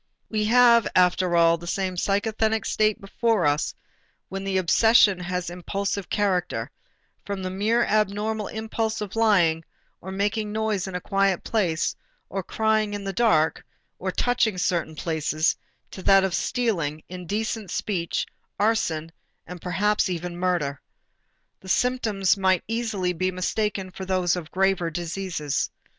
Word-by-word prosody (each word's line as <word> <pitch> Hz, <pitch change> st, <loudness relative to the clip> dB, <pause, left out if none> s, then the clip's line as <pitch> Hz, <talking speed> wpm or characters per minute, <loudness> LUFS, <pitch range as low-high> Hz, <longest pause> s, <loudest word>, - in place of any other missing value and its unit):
We 215 Hz, -1 st, 0 dB
have 235 Hz, 0 st, +6 dB
after 180 Hz, -1 st, +3 dB
all 170 Hz, 0 st, +4 dB
the 170 Hz, -, -9 dB
same 190 Hz, 0 st, -1 dB
psychasthenic 220 Hz, +3 st, 0 dB
state 215 Hz, -1 st, +1 dB
before 210 Hz, -1 st, 0 dB
us 145 Hz, +1 st, +1 dB, 0.5 s
when 195 Hz, +1 st, -5 dB
the 195 Hz, -1 st, 0 dB
obsession 200 Hz, +1 st, +5 dB
has 180 Hz, -1 st, -3 dB
impulsive 195 Hz, +2 st, -3 dB
character, 190 Hz, -4 st, 0 dB, 0.5 s
from 200 Hz, -2 st, -4 dB
the 185 Hz, -, -3 dB
mere 220 Hz, +5 st, +1 dB
abnormal 215 Hz, 0 st, 0 dB
impulse 220 Hz, 0 st, -3 dB
of 210 Hz, -1 st, -5 dB
lying, 180 Hz, -8 st, +3 dB, 0.4 s
or 190 Hz, -, -7 dB
making 205 Hz, +2 st, -1 dB
noise 215 Hz, -3 st, -1 dB
in 190 Hz, -, -6 dB
a 180 Hz, -, -3 dB
quiet 195 Hz, -2 st, +1 dB
place 175 Hz, -8 st, 0 dB, 0.3 s
or 195 Hz, -, -3 dB
crying 215 Hz, +2 st, 0 dB
in 205 Hz, -, -5 dB
the 195 Hz, 0 st, -3 dB
dark, 170 Hz, -8 st, +2 dB, 0.4 s
or 190 Hz, 0 st, -2 dB
touching 235 Hz, -1 st, +1 dB
certain 170 Hz, -3 st, -1 dB
places, 155 Hz, 0 st, 0 dB, 0.4 s
to 190 Hz, -, -8 dB
that 195 Hz, 0 st, +5 dB
of 190 Hz, -2 st, 0 dB
stealing, 175 Hz, -, -1 dB
indecent 200 Hz, +3 st, -4 dB
speech, 175 Hz, -5 st, -2 dB, 0.3 s
arson, 185 Hz, -7 st, 0 dB, 0.3 s
and 180 Hz, 0 st, -9 dB
perhaps 205 Hz, +3 st, +1 dB
even 175 Hz, 0 st, -4 dB
murder. 175 Hz, -6 st, -1 dB, 0.8 s
The 190 Hz, -, -12 dB
symptoms 220 Hz, -4 st, +2 dB
might 190 Hz, -3 st, +2 dB
easily 220 Hz, -5 st, -1 dB
be 185 Hz, +2 st, 0 dB
mistaken 190 Hz, +1 st, -2 dB
for 190 Hz, +1 st, -7 dB
those 185 Hz, -2 st, +1 dB
of 170 Hz, -3 st, -6 dB
graver 190 Hz, -2 st, +1 dB
diseases. 170 Hz, -3 st, -3 dB
195 Hz, 140 wpm, -25 LUFS, 180-215 Hz, 0.8 s, have